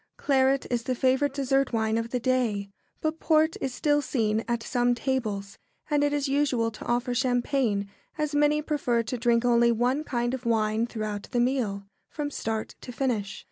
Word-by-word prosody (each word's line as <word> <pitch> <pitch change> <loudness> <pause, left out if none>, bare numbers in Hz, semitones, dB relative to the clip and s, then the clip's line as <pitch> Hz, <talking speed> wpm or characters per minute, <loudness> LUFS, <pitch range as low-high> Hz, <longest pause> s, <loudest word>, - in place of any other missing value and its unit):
] - - -51
Claret 270 -1 +2
is 240 -1 +1
the 255 +2 -2
favourite 265 +3 +2
dessert 275 -1 +1
wine 220 -1 +1
of 230 0 -1
the 250 - -1
day, 230 -6 0 0.3
but 315 +1 -1
port 315 0 +3
is 270 - -1
still 290 +3 +1
seen 225 -5 0
at 235 -1 -1
some 245 -1 +1
tables, 220 -6 -3 0.3
and 290 -1 +3
it 290 - +2
is 290 -1 0
usual 270 -5 +1
to 215 - -10
offer 245 +1 0
champagne, 245 -4 +1 0.3
as 300 -1 -1
many 295 +1 +3
prefer 250 -7 0
to 245 +3 -4
drink 235 0 +2
only 235 -1 +4
one 250 +6 +1
kind 240 -3 -1
of 260 -1 -4
wine 225 0 +1
throughout 215 -3 -4
the 245 - 0
meal, 240 -6 0 0.2
from 290 -1 -4
start 220 -4 -3
to 250 - -8
finish. 225 -6 -2
245 Hz, 185 wpm, -27 LUFS, 230-275 Hz, 0.3 s, only